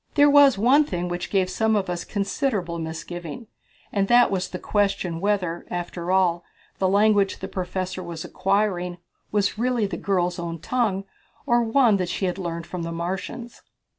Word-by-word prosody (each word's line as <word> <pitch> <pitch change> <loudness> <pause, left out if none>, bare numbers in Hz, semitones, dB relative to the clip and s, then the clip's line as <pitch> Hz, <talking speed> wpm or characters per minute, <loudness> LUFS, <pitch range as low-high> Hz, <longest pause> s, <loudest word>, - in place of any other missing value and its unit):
There 290 -1 +6
was 280 -5 +7
one 255 +8 +5
thing 180 -9 -3
which 175 0 -4
gave 190 -2 +2
some 220 +3 +1
of 200 -2 0
us 175 -1 -3
considerable 200 - -2
misgiving, 165 +4 -6 0.5
and 195 -1 +1
that 240 0 +5
was 185 -1 -1
the 180 - -5
question 195 -4 0
whether, 190 -4 0
after 175 0 -4
all, 175 -2 +2 0.4
the 190 - +2
language 205 0 +3
the - - -6
professor 185 0 -4
was 170 -2 -6
acquiring 195 -3 0 0.3
was 205 0 0
really 245 -2 +1
the 190 -4 -4
girl's 180 -2 0
own 170 -1 -4
tongue 195 +1 -1 0.4
or 240 -3 +3
one 230 -2 +4
that 180 -2 -2
she 190 - -2
had 180 +1 -2
learned 170 -2 -4
from 180 0 -6
the 165 0 -4
Martians. 190 +8 -5
190 Hz, 170 wpm, -24 LUFS, 175-215 Hz, 0.5 s, was